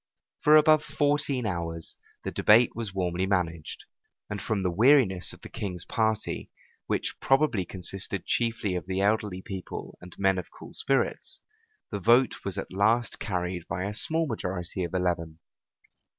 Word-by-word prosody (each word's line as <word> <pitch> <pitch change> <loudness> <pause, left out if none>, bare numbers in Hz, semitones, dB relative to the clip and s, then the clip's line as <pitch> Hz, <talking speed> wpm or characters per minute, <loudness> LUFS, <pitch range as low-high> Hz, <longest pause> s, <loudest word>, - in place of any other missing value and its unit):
For 150 +1 +6
above 155 0 +6
fourteen 145 -4 0
hours 85 -4 -3 0.3
the - - -3
debate 115 +3 +5
was 115 -3 -4
warmly 90 -1 -1
managed; 85 -5 -2 0.5
and 105 - -3
from 105 -3 -1
the 90 - +1
weariness 105 - +4
of - - -12
the - - -7
king's 90 -4 -5
party, 110 -1 -1 0.4
which - - -1
probably 135 -9 +2
consisted 95 +1 -4
chiefly 115 -4 0
of 90 0 -4
the 95 0 -1
elderly 100 -2 0
people, 95 -2 -7
and 90 0 -12
men 95 -1 +2
of 90 - -7
cool - - -12
spirits, 135 -1 0 0.5
the 100 - -2
vote 120 +6 +4
was 100 -2 -2
at - - -5
last 110 +5 +2
carried 90 -3 -3
by 90 +2 -3
a 100 +1 -3
small 160 +9 +1
majority 95 - -3
of 85 +1 -4
eleven. 85 -3 -1
95 Hz, 155 wpm, -28 LUFS, 90-115 Hz, 0.5 s, For